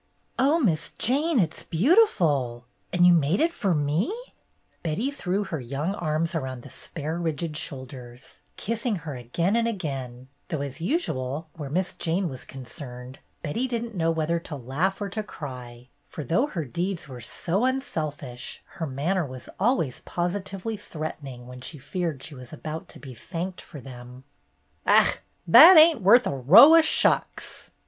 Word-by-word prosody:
"Oh, 285 +6 +4
Miss 165 - +1
Jane, 290 +6 +1
it 170 -8 +2
's - - -8
beautiful! 160 - +2 0.3
And 180 -1 +4
you 180 - +7
made 165 +3 +2
it 335 +1 +2
for 195 - 0
me 150 +6 +1
1 420 - -3 0.4
" - - -42
Betty 175 - -1
threw 200 -7 -2
her 175 -6 -4
young 140 +9 -3
arms 165 -2 -1
around 130 -6 -4
the - - -12
spare, 160 +1 -5
rigid 160 -1 -3
shoulders, 130 -4 -7 0.2
kissing 230 +1 -2
her 145 -3 -5
again 165 - -1
and 230 0 +2
again; 135 - -5 0.2
though 155 -4 -3
as 140 +2 -6
usual 160 - -2
where 150 -4 -6
Miss 185 +6 -1
Jane 175 +2 -1
was 130 -2 -8
concerned, 130 -1 -8 0.2
Betty 225 - -1
didn't 235 -2 -4
know 165 -4 0
whether 165 +1 0
to 165 -2 -8
laugh 140 +9 -2
or 200 - -3
to 215 +3 -3
cry, 125 - -9 0.2
for 155 - -7
though 180 - +1
her 170 - -4
deeds 170 +6 -3
were 125 -3 -9
so 175 - -1
unselfish, 155 - -3 0.2
her 160 - -1
manner 160 +8 -1
was 130 -3 -9
always 195 - +1
positively 195 +4 -3
threatening 150 -9 -7
when 125 0 -10
she 150 - -6
feared 160 -1 -4
she 155 - -6
was 125 -3 -11
about 155 +1 -7
to - - -8
be 135 -3 -10
thanked 180 - -6
for 150 - -11
them. 125 -1 -11 0.6
"Ach, - - +5 0.3
that 315 - +10
ain't 315 -5 +7
worth 235 +7 +6
a - - -1
row 165 - +8
o' 330 - +8
shucks." 315 - +1
160 Hz, 170 wpm, -25 LUFS, 135-200 Hz, 0.6 s, that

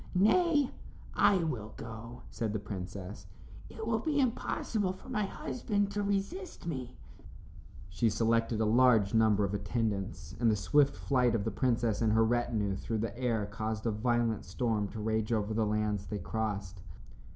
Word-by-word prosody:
"Nay, 290 - +4 0.4
I 190 -4 +4
will 110 -9 -4
go," 115 +2 -8
said 110 -2 -2
the 110 - -1
princess; 95 0 -7 0.4
"it 220 - -7
will 225 0 +1
be 290 +4 0
impossible 220 -5 0
for 190 - -14
my 215 -5 0
husband 205 -1 -2
to 205 0 -1
resist 200 - -3
me." 130 -7 -5 0.9
She 95 +5 +1
selected 115 +1 +1
a - - +3
large 110 -3 +4
number 110 -2 +4
of 100 - -3
attendants, 100 -5 -2
and 120 -1 +4
the 110 - +3
swift 140 +7 +3
flight 125 -4 +2
of 105 - 0
the 110 - -1
princess 115 -4 +1
and 110 -2 +3
her 110 0 +5
retinue 110 -4 0
through 110 +3 -3
the 110 -1 -3
air 115 -4 0
caused 110 +2 -4
a 115 - +2
violent 115 0 0
storm 105 +1 -1
to 110 - -8
rage 110 +1 -1
over 110 -1 0
the 110 -1 +1
lands 105 -2 -1
they 105 - -3
crossed. 100 -2 -3
115 Hz, 165 wpm, -31 LUFS, 105-130 Hz, 0.9 s, her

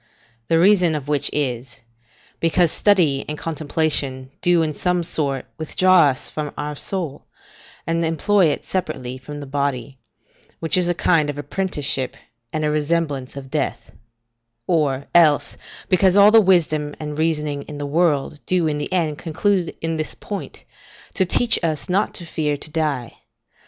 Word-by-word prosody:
The 165 - +3
reason 180 -2 +4
of 145 -2 -5
which 145 -1 +1
is, 125 -4 -3 0.6
because 165 0 +2
study 170 -10 +2
and 150 - -4
contemplation 145 -4 -2
do 175 -2 +4
in 155 -1 -2
some 180 +2 0
sort 140 -6 -2
withdraw 170 -1 +4
from 150 +3 -5
us - - -10
our 150 0 -4
soul, 160 -3 -4 0.6
and 165 +1 0
employ 165 +4 +2
it 145 - -2
separately 130 -9 -4
from 145 +3 -8
the 145 - -7
body, 140 -2 -3 0.6
which 165 - +1
is 180 -1 +2
a 175 - +1
kind 160 -4 +2
of 145 - -4
apprenticeship 145 -5 -2 0.3
and 155 -1 -1
a 150 - +1
resemblance 150 -3 -1
of 135 -1 -9
death; 150 -2 -3 0.7
or, 140 -5 0
else, 155 -4 +4 0.3
because 185 0 +3
all 205 +1 +8
the 225 0 +7
wisdom 155 -6 +2
and 150 -1 -5
reasoning 150 -3 0
in 150 - -7
the 145 - -4
world 150 -1 +1
do 180 -2 +2
in 150 -1 -1
the 145 - -4
end 160 -5 0
conclude 180 +2 0
in 165 0 -2
this 155 - -4
point, 205 -2 -7 0.5
to 190 - +1
teach 235 +5 +2
us 155 -3 -1
not 195 +3 0
to 175 - -7
fear 150 -2 -1
to 155 - -7
die. 150 -7 -2
155 Hz, 160 wpm, -21 LUFS, 145-175 Hz, 0.7 s, all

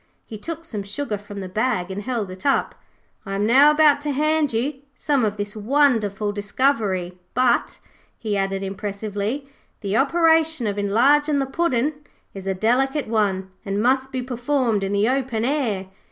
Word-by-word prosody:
He 225 - -9
took 330 +9 -6
some 215 -10 -5
sugar 210 +4 -4
from 205 0 -8
the 190 - -5
bag 190 -2 -1
and 195 +2 -4
held 225 -5 -3
it 185 0 -10
up. 280 - +1 0.5
'I 195 -2 -4
am 200 +1 0
now 270 +6 +7
about 300 -1 +4
to 295 - -3
hand 305 +1 +1
you 265 +5 -2
some 280 -1 0
of 210 -1 -1
this 205 +1 -4
wonderful 215 -4 +1
discovery. 205 -4 -1 0.2
But,' 250 -1 +2 0.4
he 215 -3 -2
added 195 0 -1
impressively, 205 +6 -4 0.3
'the 200 -1 -2
operation 320 -2 +3
of 205 -1 -2
enlarging 280 +9 +3
the 275 - +1
puddin' 285 -1 0 0.4
is 195 -1 -8
a 190 - 0
delicate 265 +8 +1
one, 195 -4 0
and 200 0 -2
must 260 +3 +1
be 255 -2 -3
performed 245 -3 0
in 195 - -2
the 205 +2 +2
open 250 -3 0
air. 245 -9 -1
230 Hz, 170 wpm, -22 LUFS, 200-275 Hz, 0.5 s, now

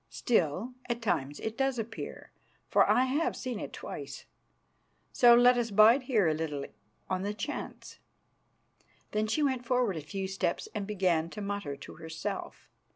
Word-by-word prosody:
"Still, 210 - 0 0.2
at 240 0 -1
times 145 - -1
it 220 0 -3
does 270 0 0
appear, 225 0 -6 0.4
for - - +4
I 255 - +5
have 300 +7 0
seen 250 -4 -4
it - - -6
twice. - - -7 0.9
So 240 -2 +7
let 245 +1 +6
us 235 -1 -1
bide 215 +6 +6
here 230 -8 +2
a 155 - +3
little 150 -3 -3 0.4
on 185 0 -1
the 205 +2 -3
chance." 215 +8 -6 1.1
Then 215 +1 0
she 300 +8 +1
went 260 -3 0
forward 245 -6 +1
a - - -4
few 190 +6 -4
steps 190 -2 -2
and 200 -2 -3
began 180 -6 +1
to 210 - -7
mutter 200 -8 -3
to 140 - -11
herself. 160 0 -6
210 Hz, 160 wpm, -30 LUFS, 180-245 Hz, 1.1 s, So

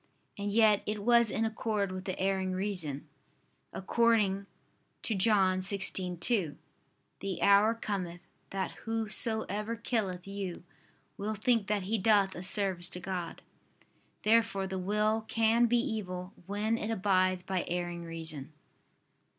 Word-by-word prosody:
And 205 0 -3
yet 215 -1 +5
it 210 -1 -2
was 235 0 +5
in 225 - 0
accord 215 -3 -1
with 185 0 -6
the 185 - -3
erring 190 -1 0
reason, 180 -8 -2 0.6
according 200 -2 +2 0.6
to 225 - 0
John 190 -2 +3
16:2: 185 -2 +1 0.6
"The 195 -2 -4
hour 200 +3 +5
cometh, 185 -6 -4 0.3
that 195 -1 -2
whosoever 220 -1 -1
killeth 210 -6 -2
you, 195 -4 -5 0.5
will 215 +2 -3
think 220 0 +1
that 205 -2 0
he 215 +4 -1
doth 200 -1 +3
a 175 - -7
service 185 -2 0
to 180 - -5
God." 180 -2 -5 0.8
Therefore 220 -3 +3
the 190 0 -3
will 210 +3 +1
can 225 +1 +3
be 240 +1 +3
evil, 190 -5 -3
when 215 +3 0
it 210 - -3
abides 185 -3 +2
by 185 -1 -1
erring 175 0 -3
reason. 160 -3 -5
200 Hz, 130 wpm, -31 LUFS, 185-220 Hz, 0.8 s, yet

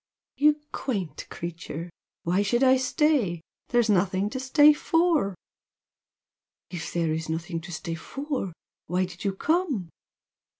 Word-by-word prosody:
"You 300 +1 +4
quaint 200 - -3
creature! 170 0 -6 0.3
Why 180 +4 +2
should 240 +5 +2
I 260 0 +7
stay? 260 - +2 0.3
There's 240 -2 +3
nothing 195 0 +2
to 260 - -3
stay 290 +3 +6
for!" 325 - +2 1.4
"If 175 -3 -5
there's 160 -1 -1
nothing 165 +1 -3
to 175 +2 -9
stay 165 +1 -4
for, 270 - -4 0.4
why 180 +2 +1
did 180 0 -10
you 195 -2 0
come?" 295 - 0
195 Hz, 125 wpm, -26 LUFS, 175-275 Hz, 1.4 s, I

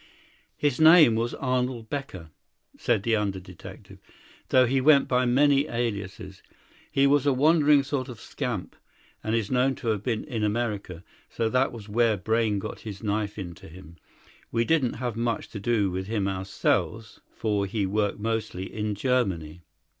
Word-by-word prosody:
"His 145 -4 0
name 160 -6 +8
was 115 +2 -1
Arnold 125 -3 -2
Becker," 95 - -6 0.4
said 115 -5 0
the 115 0 +2
under 100 -3 -1
detective, 90 -1 -12 0.5
"though 130 -1 +5
he 130 +2 +1
went 140 0 +5
by 125 0 +2
many 140 +3 +3
aliases. 100 -4 -4 0.5
He 135 - +3
was 145 0 +3
a 140 - +4
wandering 150 +1 +4
sort 135 -2 -3
of 120 -4 -9
scamp, - - -5 0.5
and 110 +1 0
is 110 -3 -1
known 130 +1 +2
to 115 - -4
have 105 -3 0
been 110 -1 -2
in 115 -7 -4
America; 105 -5 -2 0.3
so 115 -1 -1
that 130 +3 +2
was 110 -4 -10
where 110 0 +2
Brayne 110 +2 0
got 95 - -6
his 100 -2 -8
knife 105 0 -2
into 85 -5 -8
him. 85 -1 -13 0.5
We 115 0 +1
didn't 145 -5 +2
have 120 -2 -4
much 115 0 -2
to 105 - -7
do 105 -2 +1
with 95 +1 -4
him 105 -3 -1
ourselves, 100 +3 -2
for 105 -3 -1
he 100 0 -1
worked 100 +1 0
mostly 110 -4 -3
in 105 -1 -2
Germany. 95 -9 -1
115 Hz, 165 wpm, -26 LUFS, 100-125 Hz, 0.5 s, name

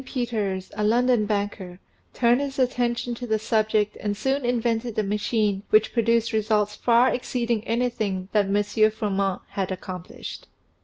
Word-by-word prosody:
Peters, 220 -8 -3
a 210 - -2
London 235 0 +3
banker, 200 -3 -3 0.3
turned 240 +2 +3
his 275 -1 -4
attention 245 -2 0
to 245 +1 -6
the 220 -1 +2
subject 215 -1 +1
and 205 -1 -2
soon 270 +4 0
invented 235 -1 -1
a 215 - +2
machine 210 0 0
which 215 0 +4
produced 230 -1 +2
results 210 -1 +1
far 240 +1 +4
exceeding 235 -3 -1
anything 220 -6 -1
that 210 -2 +3
M. 205 +2 +2
Froment 200 -3 -1
had 195 -1 -3
accomplished. 185 -1 -7
220 Hz, 145 wpm, -24 LUFS, 205-240 Hz, 0.3 s, which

